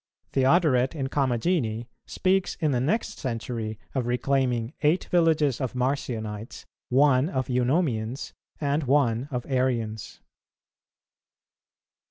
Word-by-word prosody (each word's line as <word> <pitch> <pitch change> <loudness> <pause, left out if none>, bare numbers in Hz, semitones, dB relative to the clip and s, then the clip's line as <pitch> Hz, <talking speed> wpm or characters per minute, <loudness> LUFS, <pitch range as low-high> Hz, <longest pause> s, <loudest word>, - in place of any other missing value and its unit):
Theodoret 135 -1 +3
in 135 -3 -2
Comagene 125 -3 0 0.2
speaks 190 0 +1
in 155 -2 0
the 125 - +1
next 215 - -1
century 115 -3 -4 0.2
of 130 -3 -1
reclaiming 125 -1 0
eight 155 +5 +3
villages 155 -7 +3
of 130 -1 -3
Marcionites, 120 -4 -3 0.2
one 135 +2 +4
of 130 -8 -2
Eunomians, 125 -2 0 0.3
and 145 0 0
one 130 -2 +2
of 125 -4 -3
Arians. 120 -5 -1
130 Hz, 105 wpm, -26 LUFS, 120-145 Hz, 0.3 s, one